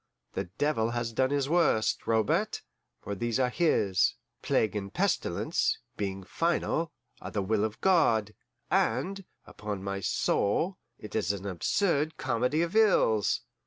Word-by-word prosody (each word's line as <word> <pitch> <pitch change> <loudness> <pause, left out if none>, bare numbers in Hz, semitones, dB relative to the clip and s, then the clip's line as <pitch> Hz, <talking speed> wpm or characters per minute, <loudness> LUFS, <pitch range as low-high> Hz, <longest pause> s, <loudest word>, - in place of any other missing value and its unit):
The - - -2
devil 145 -7 +1
has 120 -1 -3
done 130 +3 +2
his 140 -1 0
worst, 160 -9 +2
Robert, 110 -2 +1 0.4
for 100 - -4
these 120 +4 -1
are 125 -1 +2
his 105 - +2 0.3
plague 110 -1 +1
and 100 -1 -4
pestilence, - - 0 0.2
being 95 -1 -3
final, 165 - 0 0.3
are - - -6
the 100 - -2
will 105 +1 +1
of 110 0 -3
God 115 - +3 0.4
and, 185 - +1 0.2
upon 105 -2 -6
my 100 0 -3
soul, 160 - 0 0.2
it 105 - -9
is 105 -2 +1
an 100 -1 -6
absurd 150 - 0
comedy 125 +8 0
of 170 +4 -4
ills!" 185 - +3
115 Hz, 140 wpm, -29 LUFS, 105-155 Hz, 0.4 s, God